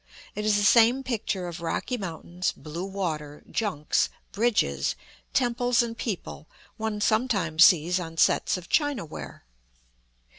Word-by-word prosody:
It 210 +1 -4
is 215 -1 +3
the 205 - +2
same 235 +5 +5
picture 215 -7 -2
of 170 0 -7
rocky 170 +9 -2
mountains, 180 -3 -3
blue 165 +4 -6
water, 155 -7 -4
junks, 185 -9 0 0.2
bridges, 70 - +1 0.4
temples, 245 -1 +2
and 230 -1 -5
people, 195 -8 -5 0.3
one 220 -1 -3
sometimes 200 -8 +4
sees 175 +1 +4
on 165 -2 -7
sets 185 - +3
of 175 -2 -10
chinaware. 285 - -2
195 Hz, 125 wpm, -26 LUFS, 165-230 Hz, 0.4 s, same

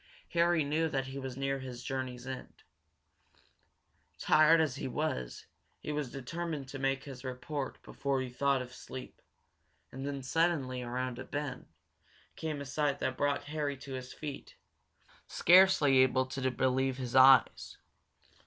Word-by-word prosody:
Harry 170 -1 +3
knew 155 +3 0
that 135 -2 -1
he 135 +1 -6
was 130 -1 -6
near 135 0 -1
his 125 -2 -8
journey's 130 -2 -4
end. 130 -1 -8 1.5
Tired 155 +2 +5
as 150 -4 +1
he - - -4
was, 125 - -3 0.3
he - - -5
was 145 -4 -3
determined 150 +1 -5
to 135 - -7
make 135 0 0
his 135 -3 -9
report 130 +2 -5
before 140 -1 -2
he 130 - -2
thought 135 0 +1
of 125 0 -12
sleep. 130 0 -9 0.7
And 135 +1 -7
then, 140 -1 -4
suddenly, 135 -4 0
around 125 0 -3
a - - -5
bend, 145 -3 -5 0.7
came 155 -3 -4
a - - -5
sight 140 +1 0
that 130 -2 -2
brought 145 0 0
Harry 145 -2 -3
to 135 +1 -9
his 130 -1 -6
feet, 145 -3 -8 0.7
scarcely 175 -7 +5
able 130 0 +4
to 130 0 -2
believe 130 +1 0
his 125 -2 -5
eyes. 130 -1 +6
135 Hz, 150 wpm, -32 LUFS, 130-145 Hz, 1.5 s, eyes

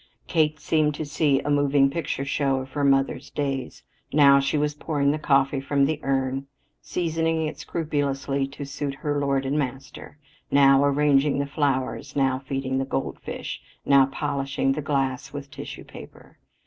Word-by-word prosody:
Kate 155 -2 +1
seemed 150 0 +1
to 155 - -4
see 145 -1 +2
a 145 - -2
moving 145 -1 +4
picture 140 -1 -3
show 135 0 +1
of 130 0 -5
her 145 +2 -2
mother's 135 -1 +1
days. 135 -3 -3 0.3
Now 140 -1 +6
she 140 +2 0
was 150 0 0
pouring 145 -2 0
the 155 - -2
coffee 135 -2 +2
from 140 0 +2
the 155 +1 -1
urn, 135 0 -1 0.3
seasoning 165 -2 -1
it 155 - -5
scrupulously 140 -3 -1
to 140 +1 -8
suit 140 0 -4
her 145 +1 -2
lord 135 -1 0
and 140 +3 0
master, 135 +1 -6 0.3
now 135 0 +5
arranging 145 0 +3
the 140 - 0
flowers, 140 -1 -2
now 135 -2 +2
feeding 135 -1 -2
the - - 0
goldfish; 135 0 -4 0.2
now 140 -1 +5
polishing 135 -1 -1
the 145 +3 -1
glass 135 -3 -2
with 140 -1 -7
tissue - - -8
paper. - - -14
140 Hz, 160 wpm, -25 LUFS, 135-145 Hz, 0.3 s, Now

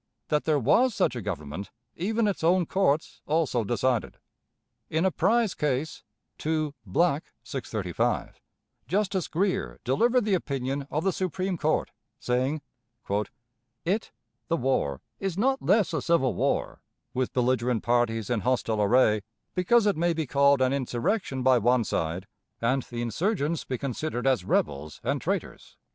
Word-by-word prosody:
That 150 -1 +1
there 155 -2 +3
was 210 - +3
such 130 - +1
a 120 - -3
Government 90 -1 -5 0.3
even 220 +5 0
its 200 -5 -2
own 175 +2 +4
courts 160 -4 0
also 150 -6 +1
decided. 120 +2 0 0.7
In 160 +4 +1
a 190 - +3
prize 225 +2 +2
case 145 +1 -1 0.4
(2 155 -2 -1
Black, 150 - +1
635), 110 -9 -2 0.5
Justice 195 -1 0
Greer 170 - -1
delivered 235 - +2
the 210 - +1
opinion 140 -4 -2
of 155 +2 -1
the 195 - +1
Supreme 185 +1 -2
Court, 155 -1 0 0.3
saying: 130 +5 0 1.2
"It 200 +6 0 0.4
[the 165 - +1
war] 120 - 0 0.2
is 190 -3 -2
not 265 +5 +2
less 195 -2 +3
a 160 - 0
civil 160 -6 +2
war, - - -1 0.3
with 130 0 -1
belligerent 125 -2 +1
parties 120 -2 +1
in 120 - +2
hostile 115 -2 0
array, 110 0 +4 0.3
because 210 +5 +3
it 205 -4 +2
may 170 +1 +2
be 160 -1 -2
called 140 0 +4
an 130 +1 +2
'insurrection' 135 - -1
by 130 -1 +5
one 120 +2 +3
side, 85 -1 -2 0.3
and 130 +4 +1
the 120 -1 -3
insurgents 160 - -1
be 130 - -3
considered 135 0 -3
as 130 -8 +3
rebels 75 -2 -1
and - - -1
traitors. - - -4
140 Hz, 145 wpm, -27 LUFS, 120-180 Hz, 1.2 s, by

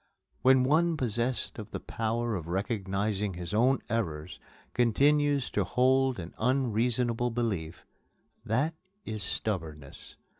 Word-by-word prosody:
When 130 0 +5
one 160 +5 +3
possessed 120 -1 -1
of 105 0 -7
the - - -5
power 115 +1 -2
of 85 -4 -5
recognizing 100 +1 -1
his 85 +1 -6
own 125 +5 +3
errors 80 -8 -3 0.3
continues 140 +3 +3
to - - +1
hold 130 +1 +2
an 85 -2 -7
unreasonable 120 -1 +1
belief 100 -9 -3 0.6
that 140 +9 0 0.3
is 110 -1 -4
stubbornness. 80 -11 -4
115 Hz, 115 wpm, -29 LUFS, 95-130 Hz, 0.6 s, When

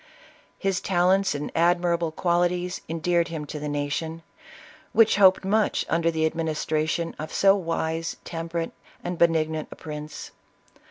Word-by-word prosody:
His 195 -1 -1
talents 190 0 +2
and 145 +1 -4
admirable 170 -1 +2
qualities 175 +2 0
endeared 170 +1 +1
him 160 -3 -5
to 150 +1 -6
the 150 0 -4
nation, 150 +3 -3 0.7
which 225 -3 +5
hoped 190 -1 +5
much 210 +2 +1
under 165 0 +2
the 160 -1 0
administration 160 0 -1
of 155 - -5
so 195 0 +5
wise, 165 -2 -2
temperate, 165 0 -4 0.3
and 175 -1 -4
benignant 160 -2 +2
a - - -9
prince. 150 -1 -8
165 Hz, 130 wpm, -25 LUFS, 160-180 Hz, 0.7 s, which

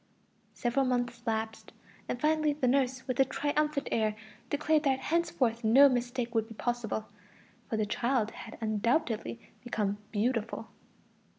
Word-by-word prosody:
Several 245 +3 +1
months 245 -2 -1
elapsed, 220 0 -3 0.4
and 245 - -2
finally 305 0 +2
the 285 -3 0
nurse, 260 0 +1
with 255 -1 -2
a - - +8
triumphant 290 +2 0
air, 215 -1 +1 0.3
declared 300 +1 +2
that 275 -3 +2
henceforth 260 -6 0
no 255 +6 +8
mistake 245 -1 -1
would 225 -1 +1
be 225 - -11
possible, 235 -2 -2 0.6
for 225 - -1
the 215 - +1
child 235 0 0
had 225 - -9
undoubtedly 220 - 0 0.2
become 210 -4 -1
"beautiful." 230 +1 -1
245 Hz, 135 wpm, -30 LUFS, 225-275 Hz, 0.6 s, a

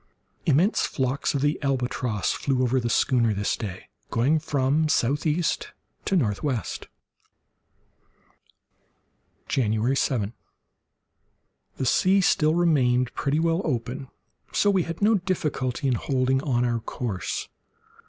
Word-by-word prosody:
Immense 165 - +3
flocks 135 +2 -1
of 140 - 0
the 145 +1 0
albatross 125 -6 -1
flew 130 -2 0
over 130 +1 +2
the 120 -1 -2
schooner 115 -3 +2
this 100 +1 0
day, 95 -5 -7 0.2
going 135 +8 +2
from 150 +1 +1
southeast 150 +5 0 0.3
to 195 - +1
northwest. 120 - -1 2.6
January 115 0 +1
7.—The 120 +2 -7
sea 185 +10 +3
still 155 -4 +3
remained 130 -8 +2
pretty 145 +2 0
well 165 +2 +1
open, 125 -1 -3 0.4
so 205 - +2
that - - +3
we 190 - +3
had 165 +4 -4
no 215 -1 +4
difficulty 150 -7 -2
in 130 - +2
holding 130 +2 0
on 125 -4 +1
our 120 -1 0
course. 110 -3 -4
130 Hz, 115 wpm, -25 LUFS, 120-155 Hz, 2.6 s, no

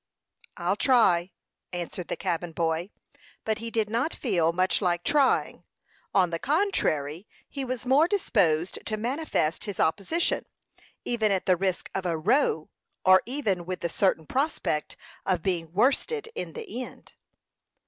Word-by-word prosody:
"I'll - - 0
try," 190 -9 +4 0.4
answered 175 0 -5
the - - -2
cabin 175 -2 -3
boy; 165 +2 -1 0.6
but 220 -1 0
he 230 0 -4
did 225 -2 0
not 235 +9 -1
feel 175 - +1
much 185 +4 +2
like 175 -2 +1
trying; 285 +1 +2 0.5
on 180 -3 +3
the 165 - -2
contrary, 205 - 0 0.2
he 275 - -5
was 255 -1 -4
more 275 +6 +5
disposed 185 - +1
to 215 - -1
manifest 240 - -1
his 205 -3 -4
opposition, 205 - +1 0.6
even 220 -3 +1
at 190 -2 0
the 185 - +4
risk 185 0 -1
of 185 -1 -2
a 165 -2 0
"row," 175 - +1 0.3
or 185 0 +7
even 220 -10 -1
with 180 +1 -5
the 170 - -1
certain 165 -2 +1
prospect 265 - -1 0.3
of 180 -4 0
being 170 -4 -1
worsted 345 - +1
in 470 - -5
the 430 - -6
end. - - -13
195 Hz, 150 wpm, -27 LUFS, 175-255 Hz, 0.6 s, or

